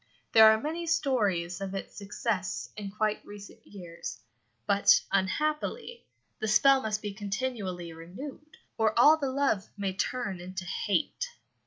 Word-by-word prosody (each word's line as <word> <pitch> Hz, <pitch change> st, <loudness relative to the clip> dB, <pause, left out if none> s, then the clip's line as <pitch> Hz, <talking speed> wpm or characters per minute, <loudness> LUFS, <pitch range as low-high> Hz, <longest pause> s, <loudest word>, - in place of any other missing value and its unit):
There 220 Hz, -1 st, +9 dB
are 220 Hz, -, +2 dB
many 325 Hz, +6 st, -4 dB
stories 205 Hz, -, 0 dB
of 195 Hz, 0 st, -4 dB
its 195 Hz, -, -6 dB
success 200 Hz, -1 st, -3 dB
in 205 Hz, -2 st, -5 dB
quite 215 Hz, +1 st, -1 dB
recent 205 Hz, -1 st, -11 dB
years, 175 Hz, -4 st, -8 dB, 0.5 s
but, 200 Hz, -1 st, +5 dB
unhappily, 305 Hz, -, -1 dB, 0.3 s
the 220 Hz, -, -2 dB
spell 270 Hz, +5 st, +5 dB
must 215 Hz, -2 st, -2 dB
be 205 Hz, -1 st, -4 dB
continually 200 Hz, -5 st, -4 dB
renewed, 260 Hz, -, -10 dB, 0.2 s
or 220 Hz, -1 st, +2 dB
all 300 Hz, +6 st, +7 dB
the 280 Hz, -3 st, -2 dB
love 260 Hz, -7 st, 0 dB
may 195 Hz, -2 st, -2 dB
turn 205 Hz, -2 st, -2 dB
into 185 Hz, +1 st, -6 dB
hate. 210 Hz, -, -1 dB
210 Hz, 140 wpm, -29 LUFS, 190-265 Hz, 0.5 s, There